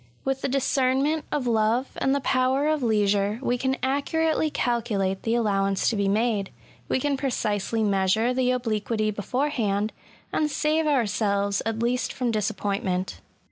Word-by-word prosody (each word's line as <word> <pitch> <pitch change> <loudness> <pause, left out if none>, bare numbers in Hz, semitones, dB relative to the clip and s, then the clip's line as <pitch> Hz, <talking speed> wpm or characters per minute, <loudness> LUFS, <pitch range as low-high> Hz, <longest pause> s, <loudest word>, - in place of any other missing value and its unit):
With 270 0 -1
the - - 0
discernment 270 +3 +1
of 285 -4 -1
love, 230 +2 +1
and 270 +1 +1
the 280 - -1
power 260 +2 +1
of 310 -1 +1
leisure, 205 -2 +1
we 245 -2 0
can 265 +2 -1
accurately 310 +4 +1
calculate 215 -8 -1
the 225 +1 0
allowance 195 -4 +1
to - - -2
be 200 -1 0
made 210 -1 +1 0.2
— - - -29
^we - - +1
can 285 +1 0
pre 270 0 -1
cisely 220 -1 -1
measure 205 +4 +2
the 250 0 +1
obliquity 220 -3 0
beforehand 215 -2 -1 0.2
— - - -29
and 305 - +1
save 305 +2 +1
ourselves 200 -6 +1
at 225 0 -2
least 250 +2 0
from 250 -2 -1
disappointment. 200 -3 -2
235 Hz, 160 wpm, -25 LUFS, 205-270 Hz, 0.2 s, measure